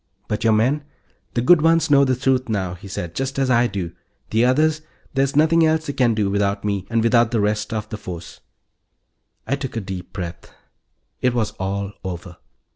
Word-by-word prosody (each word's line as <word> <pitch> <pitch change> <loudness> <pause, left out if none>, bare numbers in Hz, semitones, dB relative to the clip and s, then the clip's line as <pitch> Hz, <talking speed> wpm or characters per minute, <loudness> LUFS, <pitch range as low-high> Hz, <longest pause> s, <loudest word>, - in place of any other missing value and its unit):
"But 105 - -2
your 115 -1 +4
men 130 +7 +2 0.2
" - - -41
"The 120 - +1
good 175 +4 +6
ones 165 -1 +3
know 140 -1 +7
the 130 -1 +2
truth 130 -1 +1
now," 95 -5 -1
he 90 +2 -11
said, 90 -3 -5
"just 135 +6 -3
as 135 -1 +1
I 120 0 +4
do. 90 -6 -4 0.4
The 110 +2 +3
others... 155 +5 +3 0.3
there's 135 0 +1
nothing 160 +2 +4
else 160 0 +2
they 140 - -3
can 125 -4 +2
do, 105 -2 +1
without 100 0 0
me 100 -3 -2
and 115 -1 +1
without 115 0 +4
the 115 - 0
rest 105 +1 0
of 110 -1 -3
the 105 - -5
force." 85 -4 -8 1.1
I 135 - 0
took 135 -3 -6
a - - 0
deep 95 -3 -7
breath. 90 -3 -7 0.7
It 125 -1 +2
was 110 -3 0
all 100 +1 -2
over. 90 -2 -6
115 Hz, 200 wpm, -21 LUFS, 100-135 Hz, 1.1 s, know